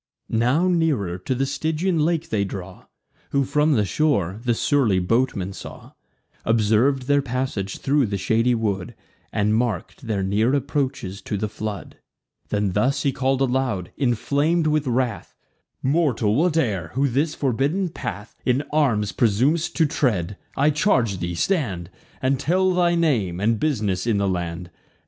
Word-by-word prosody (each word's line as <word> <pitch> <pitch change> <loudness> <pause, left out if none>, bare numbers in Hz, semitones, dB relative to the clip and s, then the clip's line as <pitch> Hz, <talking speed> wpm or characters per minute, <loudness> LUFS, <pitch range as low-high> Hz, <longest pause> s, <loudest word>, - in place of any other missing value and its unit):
Now 125 +10 +2
nearer 150 - +1
to 125 +8 -2
the 135 +2 0
Stygian 160 +5 -1
lake 165 +1 0
they 105 -2 +1
draw: 95 -1 -7 0.4
Whom, 140 0 +2
from 150 +3 +2
the 105 -6 +2
shore, 100 - 0
the 120 -2 +1
surly 120 -7 +2
boatman 100 0 0
saw; - - -10 0.5
Observ'd 115 +4 +2
their 145 +2 +2
passage 125 -7 -3
thro' 140 0 +2
the 100 -1 -2
shady 115 +6 +2
wood, 100 -5 -2 0.4
And 105 +1 +1
mark'd 115 - -2
their 100 -3 -1
near 110 +7 +2
approaches 130 -9 -2
to 105 - -3
the 105 +2 -1
flood. 105 -1 -6 0.5
Then 105 -2 0
thus 125 +9 +1
he 140 - +2
call'd 135 +1 0
aloud, 125 -8 0
inflam'd 145 +6 +1
with 150 -2 +1
wrath: 125 -1 -1 0.5
"Mortal, 130 -7 +2
whate'er, 130 - +1
who 140 +2 +2
this 145 +5 0
forbidden 145 - 0
path 105 - -6
In 130 +3 +1
arms 115 -10 +2
presum'st 130 +9 +1
to 165 - +3
tread, 105 - 0 0.2
I 145 +3 +4
charge 125 - +1
thee, 85 0 -3
stand, 100 - -1 0.3
And 130 0 +2
tell 185 +5 +2
thy 175 -1 +2
name, 115 - +1
and 110 +2 +1
bus'ness 110 -10 0
in 110 -3 +2
the 100 0 +1
land. 90 -1 -3
125 Hz, 150 wpm, -23 LUFS, 100-145 Hz, 0.5 s, I